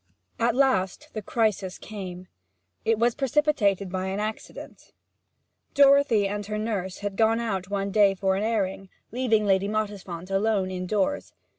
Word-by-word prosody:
At 235 0 +2
last 195 -9 +1
the 215 - -4
crisis 205 -3 -1
came: 185 -4 -8 0.6
it 225 -1 +2
was 235 +2 +2
precipitated 265 -9 +1
by 185 0 -2
an 190 +1 -3
accident. 215 +1 -7 0.8
Dorothy 275 -7 +5
and 205 +1 -3
her 210 0 -3
nurse 200 -4 -3
had 200 -1 -3
gone 225 +2 +3
out 195 -5 -3
one 200 0 -2
day 200 -1 +4
for 190 0 0
an 195 - -1
airing, 195 -3 -1 0.2
leaving 225 -3 +1
Lady 195 0 +2
Mottisfont 200 -4 -4
alone 195 -1 +1
indoors. 190 +8 -2
205 Hz, 145 wpm, -26 LUFS, 190-225 Hz, 0.8 s, Dorothy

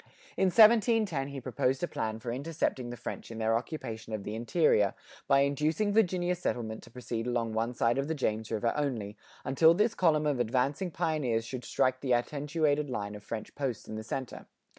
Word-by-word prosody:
In 190 - +2
1710 215 - +5
he 140 -1 -6
proposed 130 +3 -1
a - - +1
plan 110 -6 -3
for 115 +1 -5
intercepting 135 -2 -2
the 120 - -6
French - - -6
in 115 - -7
their 110 0 +1
occupation 115 -4 -5
of 105 -2 -3
the 105 - -5
interior, 115 - +2 0.3
by 140 0 +5
inducing 155 +9 +1
Virginia 180 -4 +2
settlement 115 -10 -3
to - - -14
proceed 120 -1 -4
along 115 -2 -1
one 115 +2 -1
side 120 +2 +2
of 150 +4 -1
James 110 -6 -1
River 115 +1 0
only, 120 -9 -2 0.3
until 160 +5 +5
this 215 +4 +2
column 155 -4 +2
of 145 -4 +1
advancing 130 - 0
pioneers 150 -9 -1
should 125 +2 -6
strike 130 +1 +1
the 130 -3 +1
attenuated 145 +3 0
line 105 -4 -3
of 105 0 -9
French 110 -1 -6
posts 135 -6 -3
in - - -7
the 110 0 -5
center. 130 +3 -5
130 Hz, 185 wpm, -30 LUFS, 115-155 Hz, 0.3 s, 1710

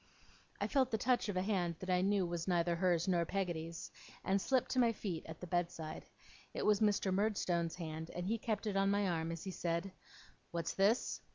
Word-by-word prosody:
I - - 0
felt 265 -3 +2
the 220 - 0
touch 245 -1 +1
of 195 - -1
a 185 - +1
hand 180 -5 0
that 185 +1 -4
I 180 0 +3
knew 195 0 +2
was 170 0 -3
neither 175 -1 +2
hers 175 -1 +2
nor 175 -2 +3
Peggotty's, 170 -3 -3 0.3
and 195 +1 +2
slipped 260 +2 +1
to 255 - +2
my 235 -2 +5
feet 185 -7 -4
at 160 0 -8
the - - -6
bed 175 0 +1
side. 160 -2 -7 0.5
It - - -1
was 210 -1 +4
Mr. 205 -3 +2
Murdstone's 185 -5 +1
hand, 160 -2 -5
and 175 0 -3
he 225 +4 0
kept 215 -1 -2
it 210 -2 -1
on 195 0 +3
my 200 0 +2
arm 165 -2 -1
as 165 -1 -5
he 190 - -4
said: 170 +2 -2 0.6
'What's 170 -1 -2
this? 205 +5 +2
185 Hz, 215 wpm, -36 LUFS, 170-205 Hz, 0.6 s, my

